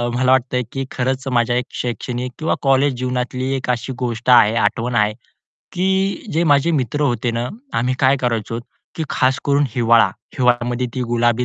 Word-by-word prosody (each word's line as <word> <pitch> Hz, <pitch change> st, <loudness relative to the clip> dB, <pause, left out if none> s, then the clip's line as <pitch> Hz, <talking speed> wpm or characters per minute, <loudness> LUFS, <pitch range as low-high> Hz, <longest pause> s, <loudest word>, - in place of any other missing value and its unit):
मला 130 Hz, +1 st, +2 dB
वाटतंय 125 Hz, -1 st, +2 dB
की 135 Hz, 0 st, -3 dB
खरंच 130 Hz, +1 st, -2 dB
माझ्या 120 Hz, +1 st, +2 dB, 0.2 s
शैक्षणिक 125 Hz, +1 st, -4 dB
किंवा 160 Hz, -, 0 dB
कॉलेज 135 Hz, 0 st, +3 dB
जीवनातली 125 Hz, +1 st, -2 dB
एक 130 Hz, -, -4 dB
अशी 120 Hz, +1 st, -1 dB
गोष्ट 120 Hz, -1 st, -3 dB
आहे, 115 Hz, -3 st, +6 dB
आठवण 115 Hz, +2 st, 0 dB
आहे, 105 Hz, -1 st, +2 dB, 0.6 s
की 190 Hz, +2 st, 0 dB
जे 165 Hz, +2 st, +1 dB
माझे 145 Hz, +1 st, +3 dB
मित्र 145 Hz, -1 st, -1 dB
होते 120 Hz, -3 st, 0 dB
ना, 115 Hz, +1 st, -2 dB, 0.3 s
आम्ही 125 Hz, +2 st, 0 dB
काय 135 Hz, +1 st, +4 dB
करायचो 115 Hz, -2 st, -2 dB, 0.3 s
की 160 Hz, -, -3 dB
खास 130 Hz, 0 st, +1 dB
करून 140 Hz, 0 st, +2 dB
हिवाळा. 115 Hz, -1 st, +4 dB, 0.3 s
हिवाळ्यामध्ये 125 Hz, 0 st, +1 dB
ती 130 Hz, -, -2 dB
गुलाबी 120 Hz, 0 st, +1 dB
125 Hz, 165 wpm, -19 LUFS, 120-135 Hz, 0.6 s, आहे